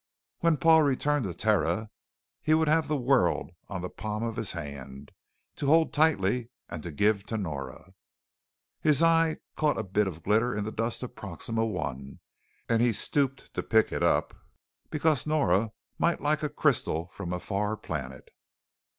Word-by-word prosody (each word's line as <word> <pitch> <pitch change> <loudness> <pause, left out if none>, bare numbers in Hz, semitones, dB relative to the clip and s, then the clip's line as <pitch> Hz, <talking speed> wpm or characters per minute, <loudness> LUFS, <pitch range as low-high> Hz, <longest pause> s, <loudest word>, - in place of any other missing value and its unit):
When 165 -2 +3
Paul 165 0 +6
returned 145 -1 +1
to 90 - -3
Terra 105 +1 +1 0.5
he 155 0 +3
would 160 0 +2
have 160 +1 +3
the 150 - 0
world 125 -11 +2 0.2
on 95 -3 -4
the 90 - -3
palm 110 0 -4
of 115 -1 -2
his 110 -4 -1
hand 70 -4 -8 0.5
to 140 - -2
hold 160 +2 +4
tightly 125 -6 +2 0.2
and 80 -2 -7
give 105 -1 +3
to 110 - -2
Nora. 80 -1 -6 0.9
His 150 0 +3
eye 165 -1 +4 0.2
caught 150 -1 +1
a - - -1
bit 100 +2 +1
of 85 -3 -7
glitter 110 +4 +2
in 105 - -1
the 110 - -4
dust 115 +3 -2
of 125 - -6
Proxima 110 +4 -3
I 70 -3 -5 0.5
and 115 0 +2
he 120 -1 +3
stooped 135 +5 -1
to - - -2
pick 110 -1 +2
it - - -2
up - - +2 0.6
because 155 -2 +1
Nora 115 - +2 0.3
might 170 0 +2
like 150 +1 0
a 150 - -1
crystal 130 - +1
from 90 -2 -6
a 90 - -2
far 105 +3 -2
planet. 65 -8 -6
110 Hz, 165 wpm, -28 LUFS, 90-150 Hz, 0.9 s, Paul